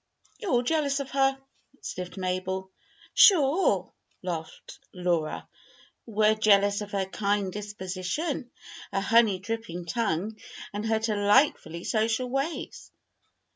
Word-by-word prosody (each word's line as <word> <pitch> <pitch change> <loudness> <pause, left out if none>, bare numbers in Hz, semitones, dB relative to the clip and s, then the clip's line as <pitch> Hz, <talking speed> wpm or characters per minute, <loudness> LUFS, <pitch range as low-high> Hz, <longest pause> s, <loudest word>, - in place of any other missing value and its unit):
"You're 420 - -4
all 245 -5 +3
jealous 285 0 +1
of 275 -1 -5
her," 270 0 +2 0.5
sniffed 180 +1 -6
Mabel. 190 +1 -3 0.4
"Sure!" 290 - +5 0.3
laughed 165 -3 -6 0.2
Laura. 175 -4 -1 0.6
"We're 215 -1 +3
jealous 205 -1 +3
of 205 - -6
her 195 -1 0
kind 200 0 -1
disposition, 205 - -4 0.4
her 195 - 0
honey 225 -1 +4
dripping 200 -3 -5
tongue, 215 +1 -2 0.3
and 210 +2 -3
her 220 0 +2
delightfully 210 - +2
social 225 +3 0
ways." 275 +5 -3
210 Hz, 110 wpm, -27 LUFS, 190-245 Hz, 0.6 s, Sure